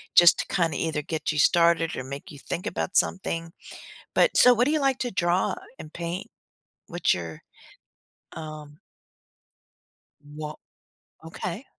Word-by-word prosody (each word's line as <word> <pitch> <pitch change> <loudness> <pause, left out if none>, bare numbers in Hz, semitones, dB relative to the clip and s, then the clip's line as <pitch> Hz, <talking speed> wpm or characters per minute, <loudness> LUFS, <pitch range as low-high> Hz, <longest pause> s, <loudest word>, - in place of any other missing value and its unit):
just 175 0 +8
to - - -1
kinda 165 -4 0
either 160 -2 -1
get 160 +1 -3
you 150 - -1
started, 170 0 +4
or 130 - -4
make 140 +6 -8
you 145 - -11
think 175 - -5
about 190 - -3
something. 165 -3 0 0.6
But - - +3
so, 250 0 +8
what 245 +2 +2
do 295 - +1
you 310 -2 +1
like 270 -2 +2
to 245 -2 -2
draw, 180 -1 +1 0.2
and 155 - -10
paint? 170 +1 -4 0.6
What's - - +1
your, 85 -3 -7 0.9
um 155 -2 -9 1.4
Wh 150 +1 -8 0.7
okay. 180 +8 -6
165 Hz, 140 wpm, -26 LUFS, 150-185 Hz, 1.4 s, just